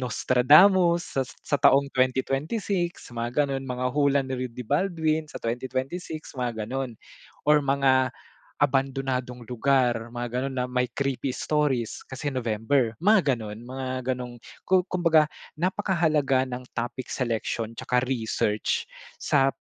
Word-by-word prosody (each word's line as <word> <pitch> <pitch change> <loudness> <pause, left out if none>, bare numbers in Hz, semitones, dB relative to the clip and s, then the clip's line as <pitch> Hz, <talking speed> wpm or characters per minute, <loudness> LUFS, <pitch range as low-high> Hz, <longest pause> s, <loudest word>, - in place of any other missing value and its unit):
Nostradamus 170 - +4
sa - - +3 0.2
sa 145 - +1
taong 140 +1 +5
2026, 145 - -1
mga 120 +5 0
ganon. 135 -1 -3
Mga 125 0 -2
hula 140 -1 +3
ni 130 -1 -3
Rudy 125 0 -8
Baldwin 160 - 0
sa - - -9
2026, 130 +7 -4
mga 120 -3 -2
ganon. 130 -1 -3 0.5
Or 150 0 +5
mga 135 -2 +2 0.5
abandonadong 135 -3 0
lugar, 120 -2 +1
mga 120 0 -3
ganon 135 +1 -2
na 125 - +1
may 125 0 +1
creepy 135 -1 -1
stories, 145 -7 -1
kasi 135 +2 -3
November, 115 +1 0
mga 190 -9 +4
ganon. 110 0 -7
Mga 130 0 -4
gano'ng 125 -1 -7 0.3
ku 185 -1 +4
kumbaga 165 -4 +4 0.3
napakahalaga 160 -8 +1
ng 125 0 -6
topic 120 +2 -3
selection 115 -2 -2
tsaka 125 0 +1
research 110 -3 0 0.4
sa 135 -2 +3
130 Hz, 125 wpm, -26 LUFS, 125-150 Hz, 0.5 s, taong